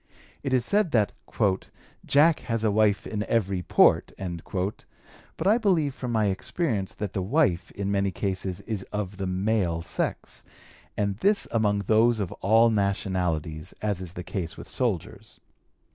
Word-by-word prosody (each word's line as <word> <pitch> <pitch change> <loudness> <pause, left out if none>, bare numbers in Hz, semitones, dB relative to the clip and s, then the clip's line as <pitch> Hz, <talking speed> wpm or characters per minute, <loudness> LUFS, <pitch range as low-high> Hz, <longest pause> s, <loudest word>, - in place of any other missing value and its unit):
It 135 - -3
is 125 -2 +2
said 205 +1 +2
that 105 -5 +3 0.9
'Jack 150 +3 +4
has 115 -2 -2
a 110 - +3
wife 105 -1 +2
in 105 -1 -3
every 100 -5 0
port,' - - +4
but 95 - -6
I 215 +5 +4
believe 170 - +2
from 125 -2 -5
my 110 -2 +2
experience 100 - -2
that 105 -3 -4
the 95 - -1
wife 95 - +1
in 100 0 -3
many 100 -1 +1
cases 95 -1 -3
is 105 -1 -4
of 100 -2 -4
the 95 -1 -3
male 95 -3 0
sex, - - -3 0.6
and 100 -1 0
this 200 - +2
among 105 -3 +1
those 115 +2 +4
of 100 -4 -2
all 115 +3 +5
nationalities, 90 -6 -1
as 100 -4 -1
is 90 -2 -7
the 90 - -6
case 90 -3 -4
with - - -9
soldiers. - - -3
100 Hz, 155 wpm, -26 LUFS, 95-115 Hz, 0.9 s, all